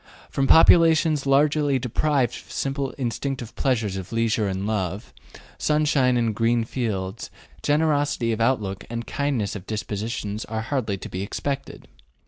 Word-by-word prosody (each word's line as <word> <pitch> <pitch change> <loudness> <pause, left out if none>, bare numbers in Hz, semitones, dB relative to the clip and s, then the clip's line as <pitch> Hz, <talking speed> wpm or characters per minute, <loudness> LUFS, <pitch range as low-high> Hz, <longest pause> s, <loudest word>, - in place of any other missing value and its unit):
From 135 -1 0
populations 160 -3 +5
largely 145 0 +3
deprived 130 0 0
of - - -11
the - - -14
simple 135 0 -2
instinctive 125 -1 -4
pleasures 110 -8 0
of 95 0 -7
leisure 115 -2 +1
and 95 0 -3
love, 100 -2 -3 0.5
sunshine 150 -5 +2
and 115 -2 +1
green 115 +2 +1
fields, 105 -6 -3 0.3
generosity 145 -5 +1
of 110 0 -2
outlook 105 -5 0
and 115 0 -4
kindliness 140 -9 -1
of 95 - -8
dispositions 110 0 -3
are 110 0 -3
hardly 115 -5 -2
to - - -8
be 95 - -5
expected. 140 +7 -4
120 Hz, 140 wpm, -24 LUFS, 105-140 Hz, 0.5 s, populations